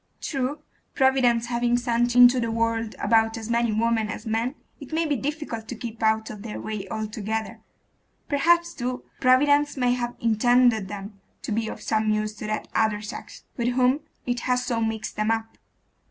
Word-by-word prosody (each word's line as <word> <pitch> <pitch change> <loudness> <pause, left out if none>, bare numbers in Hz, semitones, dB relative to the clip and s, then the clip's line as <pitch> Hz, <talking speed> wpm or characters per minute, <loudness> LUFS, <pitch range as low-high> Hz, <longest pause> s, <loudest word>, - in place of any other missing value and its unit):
True, 280 +1 -3 0.3
Providence 255 -3 +3
having 240 0 +1
sent 240 0 0
into 245 +1 +8
the 230 -1 -1
world 230 -1 -1
about 225 +1 +2
as 225 +1 -5
many 235 -1 +2
women 220 0 +1
as 225 - -6
men, 230 +4 -1 0.2
it 280 - -11
maybe 315 -2 +1
difficult 275 -5 -4
to 245 - -5
keep 230 0 -7
out 220 0 +1
of 210 -2 -9
their 215 0 -6
way 215 -3 -5
altogether. 220 0 -4 0.7
Perhaps, 340 +4 +3
too, 250 0 -4 0.2
Providence 285 +3 +4
may 250 -2 +2
have 240 -1 -3
intended 235 -1 +3
them 200 0 -8 0.2
to - - -4
be 220 +1 0
of - - -7
some 220 -1 +1
use 215 0 0
to 215 - -6
that 215 0 -3
other 215 -1 +1
sex, 210 - -8
with 235 -1 0
whom 255 +2 +3 0.3
it 245 -1 -1
has 250 0 +1
so 230 -2 -1
mixed 220 -1 -2
them 215 +1 0
up. 225 0 -2
230 Hz, 175 wpm, -25 LUFS, 220-250 Hz, 0.7 s, into